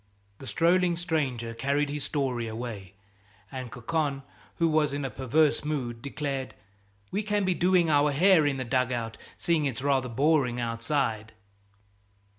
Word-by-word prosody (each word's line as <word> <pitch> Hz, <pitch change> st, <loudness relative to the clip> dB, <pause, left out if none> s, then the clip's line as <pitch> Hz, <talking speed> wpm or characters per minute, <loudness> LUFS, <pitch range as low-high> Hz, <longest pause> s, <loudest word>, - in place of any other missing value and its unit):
The 135 Hz, -, -9 dB
strolling 175 Hz, +2 st, +3 dB
stranger 140 Hz, -9 st, -2 dB
carried 140 Hz, +4 st, 0 dB
his 145 Hz, -2 st, -3 dB
story 130 Hz, -6 st, -1 dB
away, 110 Hz, -4 st, -6 dB, 0.6 s
and 130 Hz, -3 st, -6 dB
Cocon, 140 Hz, +3 st, -2 dB, 0.3 s
who 165 Hz, -, +2 dB
was 155 Hz, -3 st, +2 dB
in 140 Hz, -1 st, -2 dB
a 130 Hz, -, -3 dB
perverse 145 Hz, +5 st, +2 dB
mood, 125 Hz, -6 st, -3 dB
declared: 140 Hz, -1 st, -4 dB, 0.6 s
"We 200 Hz, -, 0 dB
can 210 Hz, -1 st, 0 dB
be 185 Hz, -, +2 dB
doing 180 Hz, -1 st, +3 dB
our 145 Hz, 0 st, +4 dB
hair 165 Hz, +1 st, +5 dB
in 140 Hz, -2 st, 0 dB
the 130 Hz, -, -3 dB
dug 130 Hz, +1 st, +1 dB
out, 115 Hz, -2 st, -3 dB, 0.2 s
seeing 165 Hz, -3 st, +1 dB
it's 130 Hz, -2 st, -3 dB
rather 135 Hz, -3 st, +1 dB
boring 135 Hz, -1 st, +2 dB
outside." 115 Hz, -1 st, -1 dB
140 Hz, 150 wpm, -28 LUFS, 120-155 Hz, 0.6 s, hair